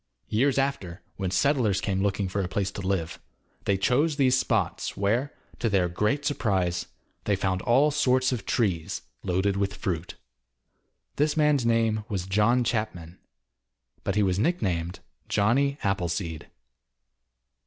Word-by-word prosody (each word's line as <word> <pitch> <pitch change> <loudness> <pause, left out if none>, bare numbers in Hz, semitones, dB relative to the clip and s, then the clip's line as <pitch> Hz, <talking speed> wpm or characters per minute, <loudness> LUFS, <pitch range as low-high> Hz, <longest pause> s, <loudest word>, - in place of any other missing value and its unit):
Years 130 +6 +2
after 105 -10 -2
when 95 -2 -2
settlers 115 -3 +2
came 95 0 -1
looking 100 -1 0
for 100 +2 -2
a 90 - -2
place 95 +1 -1
to 100 - -6
live, 95 -4 -2 0.5
they 100 - +2
chose 145 +10 +2
these 130 -3 +3
spots 130 - -1
where, 115 +8 +1 0.3
to 115 - +1
their 95 -3 +2
great 105 +11 0
surprise, 95 -10 0 0.4
they 100 - +2
found 95 -1 -1
all 135 +8 +4
sorts 130 -3 +2
of 125 -4 -2
trees 90 -9 -1 0.2
loaded 95 +2 0
with 100 +1 -1
fruit. 90 -4 -3 1.0
This 150 +2 +1
man's 150 -5 +3
name 115 -2 +2
was 95 -4 -2
John 105 +6 +3
Chapman, 105 -8 -3 0.8
but 100 - -1
he 105 - +3
was 95 -1 +1
nicknamed 95 - -1 0.3
Johnny 135 +7 +2
Appleseed. 85 -4 -2
100 Hz, 140 wpm, -26 LUFS, 95-125 Hz, 1.0 s, all